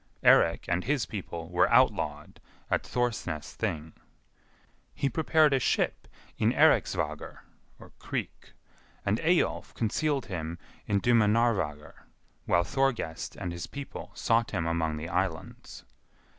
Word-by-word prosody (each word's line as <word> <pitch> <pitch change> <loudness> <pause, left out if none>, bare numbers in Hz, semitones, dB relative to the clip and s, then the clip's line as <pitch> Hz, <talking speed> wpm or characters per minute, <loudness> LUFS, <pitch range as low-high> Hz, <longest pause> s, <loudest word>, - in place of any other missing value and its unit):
Eirik - - +5
and 90 +1 0
his 140 0 +1
people 85 -5 -6
were 90 +1 +2
outlawed - - +2 0.3
at - - +2
Thorsnes 95 -11 -3
Thing. 80 -4 -3 1.0
He 140 - 0
prepared 155 +1 +3
a 135 - +3
ship - - 0 0.3
in - - +3
Eiriksvagr - - +1 0.6
(creek), - - -5 0.5
and 100 +3 +1
Eyjolf 175 +2 +1
concealed 135 +4 0
him 85 -2 -5 0.3
in 100 -1 +1
Dimunarvagr 105 -9 +2 0.5
while 85 - +3
Thorgest 115 -8 -1
and 90 -3 -4
his 85 0 -6
people 140 -1 -8
sought 115 0 +1
him 85 -5 -2
among 80 -2 -1
the 80 +2 -5
islands. 85 -1 -4
100 Hz, 115 wpm, -29 LUFS, 85-120 Hz, 1.0 s, Eirik